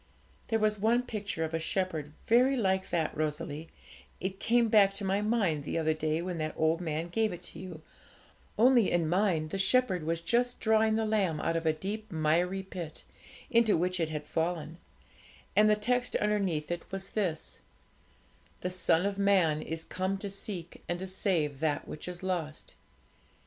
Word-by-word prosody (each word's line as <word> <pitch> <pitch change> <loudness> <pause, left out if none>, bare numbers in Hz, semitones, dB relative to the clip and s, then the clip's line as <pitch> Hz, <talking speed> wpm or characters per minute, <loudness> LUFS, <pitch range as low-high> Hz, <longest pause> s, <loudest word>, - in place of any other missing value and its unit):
There 225 - +1
was 215 -1 +1
one 235 +4 +3
picture 205 -8 -3
of 160 0 -3
a 165 - 0
shepherd 160 -3 -2
very 255 +4 +4
like 190 -4 +1
that, 160 -3 -1
Rosalie; 155 +1 -3 0.5
it 190 +1 -4
came 235 0 +3
back 210 -3 +5
to 200 - -4
my 195 +2 +1
mind 205 -9 +1
the 150 - -3
other 160 -1 +2
day, 155 +1 -1
when 180 -2 -4
that 155 0 -3
old 160 +2 +2
man 160 0 -2
gave 220 +3 +1
it 175 - -8
to - - -8
you, 175 -4 -9 0.7
only 240 -1 +5
in 170 -2 +1
mine 175 -3 +1
the 195 - -3
shepherd 195 -2 +3
was 165 +2 -1
just 245 +8 0
drawing 220 0 +3
the 220 0 +1
lamb 195 -8 +1
out 165 - 0
of 165 0 -1
a - - +5
deep 205 +7 -5
miry 170 +4 +1
pit, 175 -4 -7 0.5
into 230 -4 +4
which 180 +2 0
it 165 -2 0
had 150 -1 -4
fallen, 165 0 -2 0.8
and 215 0 +6
the 210 - +5
text 245 +4 0
underneath 195 -7 0
it 175 -1 -2
was 195 0 -4
this: 180 -7 -2 1.0
"The 180 - -2
Son 180 -1 +2
of 200 0 -2
Man 185 -6 +3
is 160 0 -3
come 185 +1 -2
to 200 0 -6
seek 190 -3 -5
and 175 - 0
to 185 - -5
save 170 -7 0
that 155 -1 -1
which 155 - -7
is 180 0 -6
lost." 170 -5 -3
185 Hz, 180 wpm, -30 LUFS, 160-210 Hz, 1.0 s, and